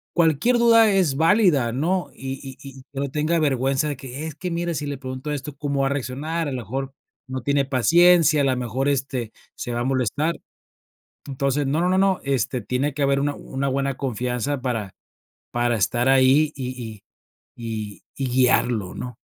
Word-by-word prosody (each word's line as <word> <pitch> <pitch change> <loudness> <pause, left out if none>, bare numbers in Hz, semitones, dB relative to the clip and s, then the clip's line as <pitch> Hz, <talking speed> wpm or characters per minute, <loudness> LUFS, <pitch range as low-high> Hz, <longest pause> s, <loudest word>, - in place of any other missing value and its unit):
cualquier 170 - +3
duda 230 -2 +6
es 180 -8 +2
válida, 160 - +3
¿no?, 175 +8 -1
y 135 0 -5
y 135 -1 -9 0.2
y 130 - -14
que 135 - -6
no 140 -1 -1
tenga 155 +4 0
vergüenza 135 0 +1
de 145 - -2
que: 135 +3 -7
"Es 155 - -7
que 180 +3 -5
mira, 170 0 -1
si 150 - -3
le 145 -1 -4
pregunto 130 +2 -6
esto, 145 0 -5
¿cómo 140 -1 -1
va - - +2
a - - 0
reaccionar?, 145 +4 -2
a - - -5
lo 130 - -3
mejor 135 +4 -5 0.3
no 130 0 -4
tiene 140 0 +2
paciencia, 160 +4 +4
a - - +2
la 130 -2 +1
mejor, 125 +3 -1
este, 130 -4 -2 0.2
se 120 - -5
va 120 - -1
a - - 0
molestar". 135 +5 0 0.8
Entonces, 140 +1 -1
no 150 +5 0
no 180 - +2
no 185 - +2
no, 195 -1 +3
este, 130 -2 -1
tiene 130 +7 -1
que 145 - -5
haber 140 0 +2
una 145 +1 0
una 135 0 -4
buena 135 0 -1
confianza, 125 +1 -2
para 115 -7 -3 0.6
para 120 0 +1
estar 120 +4 +1
ahí 135 +3 +4
y 130 -2 -4
y 110 -3 -8 0.5
y 110 -3 -6
y 135 - -2
guiarlo, 120 -5 +2
¿no? 125 -2 -6
135 Hz, 195 wpm, -23 LUFS, 125-150 Hz, 0.8 s, duda